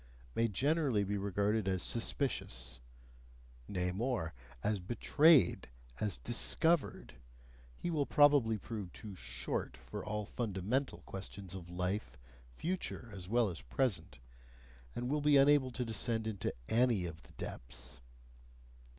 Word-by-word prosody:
may 115 - +2
generally 135 - +2
be 100 +1 -1
regarded 100 +1 0
as 95 -2 0
suspicious, 60 - -1 0.9
nay 90 -2 -1
more, 100 -5 -1 0.3
as 105 -1 +1
betrayed, 125 - +4 0.3
as 105 -9 0
discovered; 135 - +2 0.6
he 175 - -2
will 150 -4 +1
probably 145 -7 +5
prove 105 -3 -6
too 105 -3 -8
"short" 65 -3 -3
for - - -7
all 105 0 -3
fundamental 115 +5 -2
questions 95 -1 -6
of 90 -3 -8
life, 90 0 -2 0.3
future 140 - -3
as 95 -2 -7
well 120 0 +3
as 85 -9 -5
present, 85 - -1 0.8
and 120 - -2
will 150 +3 0
be 145 -1 +5
unable 140 -1 +5
to 125 0 -3
descend 115 0 -1
into 110 -3 -2 0.2
ANY 115 -5 +3
of 80 -2 -7
the - - -18
depths. 65 +2 -5
105 Hz, 125 wpm, -35 LUFS, 90-125 Hz, 0.9 s, probably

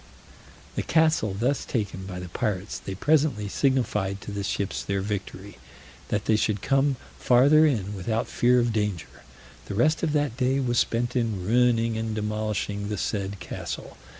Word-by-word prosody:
The - - 0
castle 155 -11 +2
thus 130 +4 +1
taken 100 -5 -3
by 90 -2 -6
the 90 -1 -7
pirates, 100 +2 -2
they 95 - -6
presently 140 - +2
signified 105 -6 0
to - - -7
the 100 0 -3
ships 100 0 -2
their 100 0 -1
victory, 100 0 -5 0.5
that 105 -1 -1
they 110 - +3
should 105 -1 0
come 135 0 +2 0.2
farther 145 +6 +5
in 105 -8 -1
without 110 +4 -1
fear 125 +1 +3
of 120 -1 +1
danger: 105 -6 -3 0.5
the 100 - -4
rest 155 +9 +2
of 165 - 0
that 145 -5 0
day 130 +1 +2
was 120 -3 +1
spent 120 +2 0
in 110 -7 -1
ruining 115 0 +2
and 110 -1 -3
demolishing 105 -1 -2
the 105 - -2
said 100 -1 -2
castle. 90 - -6
110 Hz, 165 wpm, -26 LUFS, 100-125 Hz, 0.5 s, farther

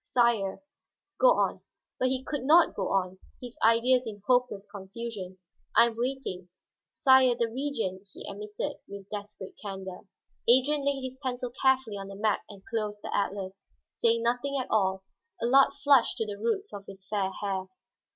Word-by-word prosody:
"Sire 235 -2 +1 0.3
" - - -62
"Go - - +7
on." - - 0 0.4
But 255 - +2
he 260 0 -1
could 290 0 -3
not 320 +5 +5
go 195 - -2
on, 185 -1 -1 0.2
his 245 -1 -9
ideas 240 +2 +4
in 205 -2 -8
hopeless 245 -5 +1
confusion. 200 -1 -7 0.4
"I - - +8
am 235 -1 -3
waiting." 235 -7 -4 0.4
"Sire, 260 -3 +5
the 235 -1 0
Regent," 225 -7 -3
he - - -9
admitted 210 +1 -5
with 200 -1 -9
desperate 205 -2 -7
candor. 190 -3 -6 0.5
Adrian 275 +4 +4
laid 280 -1 0
his 260 0 -6
pencil 250 -2 -3
carefully 260 -4 +1
on 195 0 -6
the 195 - -9
map 210 +1 +1
and 200 -2 -13
closed 210 -2 -3
the - - -3
atlas, 195 -1 -3 0.2
saying 230 0 +1
nothing 245 +4 0
at 255 - -5
all. 190 -3 +1 0.4
Allard 270 +4 +5
flushed 275 -4 +4
to 225 - -1
the 205 -1 -6
roots 310 - -2
of 200 -1 -8
his 195 -1 -11
fair 200 -3 0
hair. 195 -2 -2
225 Hz, 170 wpm, -28 LUFS, 195-255 Hz, 0.5 s, I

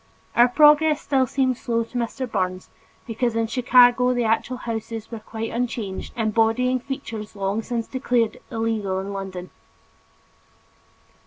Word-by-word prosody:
Our 240 +1 +6
progress 300 +3 +5
still 265 -3 +1
seemed 260 -1 0
slow 230 -3 -1
to 230 - -16
Mr. 240 +3 -3
Burns 185 -4 -3 0.3
because 235 0 -1
in 230 0 +1
Chicago, 250 +1 +4
the 245 - +1
actual 225 +3 0
houses 225 -2 -5
were 230 - -5
quite 225 +1 -6
unchanged, 230 -5 -4
embodying 225 +3 +2
features 225 -5 -6
long 200 +2 -1
since 230 0 -3
declared 245 -3 0
illegal 220 -4 -1
in 195 +1 -5
London. 190 -2 -6
230 Hz, 135 wpm, -23 LUFS, 220-250 Hz, 0.3 s, Our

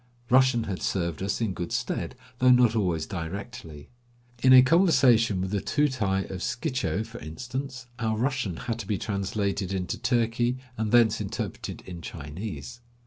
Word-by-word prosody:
Russian 130 -2 +5
had 100 -4 -4
served 85 -4 -1
us 100 +3 -1
in 110 -4 0
good 85 -2 -5
stead, - - -2 0.2
though 130 - +5
not 125 -2 +5
always 90 -7 0
directly. 85 -3 -7 0.5
In 130 - +5
a 130 -1 +10
conversation 125 - +4
with 95 +1 -2
the 100 -2 0
Tootai 100 -5 +1
of 95 - -5
Schicho, 130 - -1
for 115 +1 -10
instance, 125 - -6
our 110 -1 0
Russian 125 - -1
had 115 -1 -2
to - - -6
be 105 - 0
translated 100 -1 -2
into 95 -2 -2
Turki 120 0 +1 0.2
and 110 -2 -2
thence 115 -2 +4
interpreted 105 -2 -5
in 90 -2 -8
Chinese. 95 +11 -7
110 Hz, 155 wpm, -27 LUFS, 95-125 Hz, 0.5 s, a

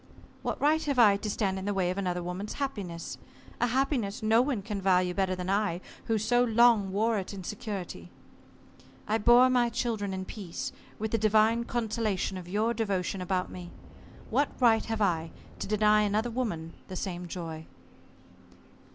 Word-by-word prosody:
What - - -3
right 310 +2 +3
have 280 -3 -1
I 215 -5 +7
to 210 +1 -4
stand 195 -2 -1
in 190 - -6
the 205 -1 -1
way 180 -2 +1
of 185 - -5
another 180 -2 -2
woman's 180 +4 -4
happiness? 200 -12 -5 0.4
A 245 - +2
happiness 245 -5 0
no 220 +2 +5
one 250 -6 -1
can 205 -1 -4
value 180 -1 +3
better 190 -1 0
than 180 0 -5
I, 195 -3 +1 0.3
who 225 - +1
so 245 +3 +3
long 230 -4 +4
wore 220 +2 +1
it 195 +1 -6
in 190 - -7
security. 205 -2 -6 1.0
I 220 +2 +1
bore 240 +4 +7
my 245 -2 +3
children 225 -4 -2
in 190 0 -4
peace, 190 -4 -6 0.3
with 220 0 -3
the 225 - +1
divine 220 +2 +3
consolation 220 -5 -1
of 180 -1 -8
your 215 +4 +1
devotion 195 -4 -1
about 180 0 -1
me. 175 -1 -8 0.6
What 285 - +2
right 230 -3 +4
have 225 -1 -1
I 165 -4 0 0.3
to - - -4
deny 210 0 +4
another 210 +3 0
woman 190 -10 -3
the 185 - -7
same 180 -1 -4
joy?" 165 -2 -6
210 Hz, 175 wpm, -29 LUFS, 185-230 Hz, 1.0 s, I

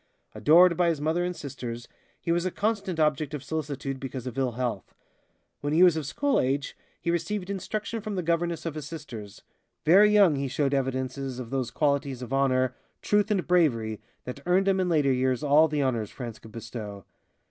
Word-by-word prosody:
Adored 170 +3 +6
by 175 0 +2
his 160 -3 -1
mother 160 +4 0
and 180 0 -2
sisters, 120 -5 -6 0.3
he 170 - -2
was 170 0 +1
a 185 - 0
constant 200 -3 -2
object 150 -1 +1
of 140 - -7
solicitude 140 -2 -4
because 130 -2 -6
of 125 - -5
ill 130 -3 0
health. 120 -5 -4 0.6
When 145 +1 -2
he 170 +3 +6
was 175 -3 +6
of 155 -4 -3
school 285 - +1
age 135 +2 -1 0.2
he 170 - -1
received 180 +3 -2
instruction 215 +3 -4
from 210 -1 -4
the 180 - -2
governess 170 0 -1
of 165 - -2
his 150 -1 -6
sisters. 120 -11 -9 0.4
Very 195 +6 +7
young 195 -8 +5
he 140 0 -1
showed 140 +1 0
evidences 130 -1 -2
of 125 -3 -7
those 130 -3 -1
qualities 140 -1 0
of 125 - -6
honor, 130 -2 +2 0.3
truth 210 0 +2
and 200 -4 +1
bravery 115 -12 +1 0.2
that 125 - -7
earned 190 +2 +3
him 195 -1 +3
in 185 -1 +1
later 145 -5 +3
years 130 0 0
all 150 +2 +5
the 150 -2 0
honors 115 -5 -1
France 120 -5 -7
could 110 - -14
bestow. 110 -3 -7
145 Hz, 195 wpm, -27 LUFS, 130-175 Hz, 0.6 s, Very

